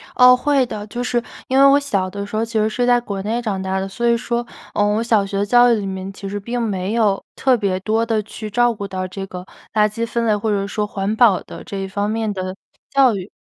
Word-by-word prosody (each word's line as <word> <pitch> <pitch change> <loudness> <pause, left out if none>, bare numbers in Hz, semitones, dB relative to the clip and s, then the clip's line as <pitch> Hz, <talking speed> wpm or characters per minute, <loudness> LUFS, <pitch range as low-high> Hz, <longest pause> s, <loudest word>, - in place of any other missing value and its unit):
哦， 250 0 +8
会 275 +1 +2
的。 210 -3 -6
就 240 +4 -4
是 245 -1 0 0.3
因 260 - +1
为 275 - +8
我 275 +1 +6
小 200 -10 -1
的 200 +1 -5
时 205 - -7
候 220 - +1
其 230 - -12
实 215 0 +2
是 245 +3 0
在 245 0 +4
国 200 -5 -5
内 225 +4 -2
长 205 -5 -2
大 190 0 -1
的， 190 - -3
所 235 +5 -2
以 235 - +4
说， 235 0 -2 0.3
呃， 205 - +2
我 210 +2 +1
小 220 -4 +2
学 200 0 -1
教 245 +3 +5
育 - - +4
里 210 -2 -3
面 190 0 -5
其 195 - -8
实 205 +1 -4
并 235 +4 -3
没 200 -3 -2
有， 215 -4 +1
特 265 -1 +3
别 195 -4 -1
多 220 +3 +1
地 225 -2 0
去 215 +1 -8
照 240 +3 +2
顾 205 -2 -6
到 185 -1 -4
这 195 +1 -6
个 180 -1 -8 0.3
垃 210 -1 +4
圾 230 +2 -3
分 230 0 -2
类， 215 -2 +3
或 210 +2 -2
者 205 -2 +1
是 200 - -3
说 210 +1 -2
环 200 0 -2
保 220 -5 +4
的 - - -10
这 200 - -6
一 195 0 -3
方 200 +2 -2
面 220 -1 -1
的 185 -1 -4 0.3
教 270 -5 +4
育。 190 +1 -6
215 Hz, 290 characters per minute, -20 LUFS, 195-235 Hz, 0.3 s, 哦